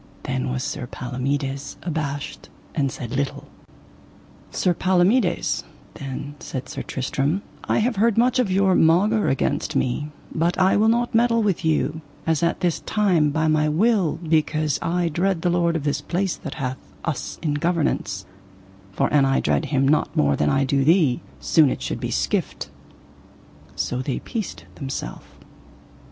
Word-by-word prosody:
Then 130 -1 -2
was 125 0 -2
Sir 120 - -4
Palomides 135 +3 -3
abashed 150 -4 -4 0.2
and 140 -5 0
said 120 0 -6
little. 140 0 -2 1.0
Sir 180 - +1
Palomides, 185 +5 +2 0.3
then 140 +1 -6
said 130 - -6
Sir - - -5
Tristram, 140 +8 -1 0.2
I - - +1
have 230 0 +1
heard 225 +1 +3
much 250 +2 +3
of 245 -6 +2
your 190 0 +3
maugre 195 +7 +4
against 140 +2 0
me, 135 +3 0 0.2
but 170 +3 +1
I 190 +1 +4
will 215 +2 +4
not 240 +2 +2
meddle 230 0 +3
with 195 -3 0
you 160 0 0 0.2
as 160 -1 +1
at 170 0 0
this 175 -3 +1
time 180 -8 +2
by 160 +2 0
my 155 -1 +3
will, 185 -1 +2
because 155 -2 +1
I 175 +1 0
dread 175 +2 0
the 175 - +2
lord 170 -1 +2
of 160 - -1
this 145 -1 0
place 180 +4 -1
that - - -7
hath 130 -2 -3 0.3
us 160 -5 -3
in 150 -3 +1
governance; 145 - -1 0.7
for 95 - +1
an 145 -2 +5
I 135 0 +2
dread - - +1
him 135 -2 +1
not 155 +2 +1
more 70 -1 +3
than 75 - +1
I 135 - +2
do 135 0 +1
thee, 155 -5 +3 0.2
soon 155 -4 +4
it - - -3
should - - -3
be - - -3
skift: - - -1 1.0
so 125 +1 -2
they 130 0 -2
peaced 220 -5 -5
themself. 135 - -6
155 Hz, 160 wpm, -23 LUFS, 135-185 Hz, 1.0 s, an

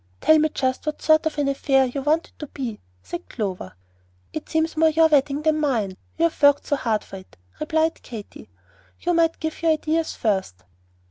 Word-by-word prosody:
"Tell 315 0 +5
me 310 +1 +2
just 260 0 -2
what 305 - -2
sort 315 0 +4
of 310 - -4
an 290 -1 +1
affair 270 -1 +2
you 260 +2 -4
want 310 +4 +1
it - - -32
to 300 - -6
be," 245 -7 -6 0.2
said 170 - -7
Clover. 190 - -4 0.6
"It 310 - -6
seems 320 +1 0
more 320 0 +4
your 320 +1 +4
wedding 290 -1 +2
than 310 -1 +2
mine, 230 -11 0 0.2
you 330 - 0
have 335 -2 0
worked 285 0 +5
so 290 - +1
hard 225 -6 -1
for 195 - -10
it," 185 - -15 0.2
replied 315 +1 0
Katy. 215 - -10 0.5
"You 350 - 0
might 330 -1 +2
give 315 0 -4
your 325 -1 +4
ideas 315 +1 -1
first." 190 - -2
295 Hz, 200 wpm, -23 LUFS, 245-315 Hz, 0.6 s, Tell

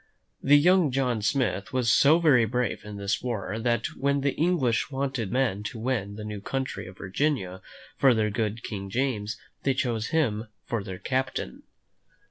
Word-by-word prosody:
The 145 +1 +6
young 175 +1 +5
John 125 -4 0
Smith 105 -4 0
was 125 -2 +2
so 150 +6 +6
very 145 -9 +5
brave 125 +2 -1
in 105 0 -8
this 100 +1 -1
war 110 -3 -3
that 120 0 0
when 140 +1 +1
the 140 0 +1
English 150 -11 +1
wanted 135 -6 -2
men 125 -6 +1
to 115 - -5
win 110 -4 -2
the 105 - -7
new 105 -1 -5
country 130 -6 -3
of 95 +1 -12
Virginia 95 -3 -1 0.4
for 135 -3 +5
their 105 -1 +1
good 110 +1 -2
King 100 -3 -5
James, 105 -3 -1 0.2
they 135 -1 +1
chose 120 -4 -1
him 115 -9 0 0.2
for 115 -4 -2
their 95 -1 -6
captain. 130 - -2
120 Hz, 170 wpm, -27 LUFS, 105-135 Hz, 0.4 s, The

